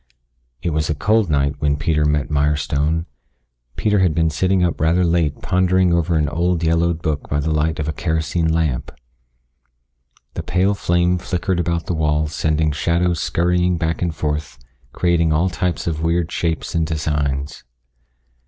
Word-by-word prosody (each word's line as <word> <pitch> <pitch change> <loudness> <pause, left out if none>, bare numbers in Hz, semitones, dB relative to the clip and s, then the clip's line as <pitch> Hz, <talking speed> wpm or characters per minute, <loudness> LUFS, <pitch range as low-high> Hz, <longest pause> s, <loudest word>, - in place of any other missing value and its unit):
It 85 - 0
was 75 0 -1
a 80 - 0
cold 105 +5 +2
night 70 -1 +1
when 70 -1 +1
Peter 75 0 +1
met 75 0 0
Mirestone. 75 +2 0 0.7
Peter 105 -2 +1
had 90 -5 +2
been 80 -1 +2
sitting 95 +3 +1
up 85 -3 -1
rather 85 +3 +3
late 85 -3 0
pondering 90 -1 +2
over 85 0 +1
an 75 -1 +1
old, 85 +2 0
yellowed 85 0 +1
book 75 -2 -2
by 70 - 0
the 75 +2 -1
light 75 +1 0
of 75 - -3
a 75 - -2
kerosene 80 +1 -1
lamp. 80 -6 -1 1.4
The - - -4
pale 95 +3 +1
flame 90 -1 +1
flickered 90 0 -2
about 85 -1 -1
the - - -2
walls 75 -1 0
sending 80 0 +1
shadows 85 +3 0
scurrying 90 +1 +1
back 80 0 -2
and 90 - +1
forth 75 -4 -3 0.3
creating 85 -2 +1
all 85 +5 +2
types 90 0 -2
of 80 -2 -2
weird 85 +1 0
shapes 80 -2 -2
and 80 -2 0
designs. 75 -3 -2
80 Hz, 160 wpm, -20 LUFS, 75-85 Hz, 1.4 s, rather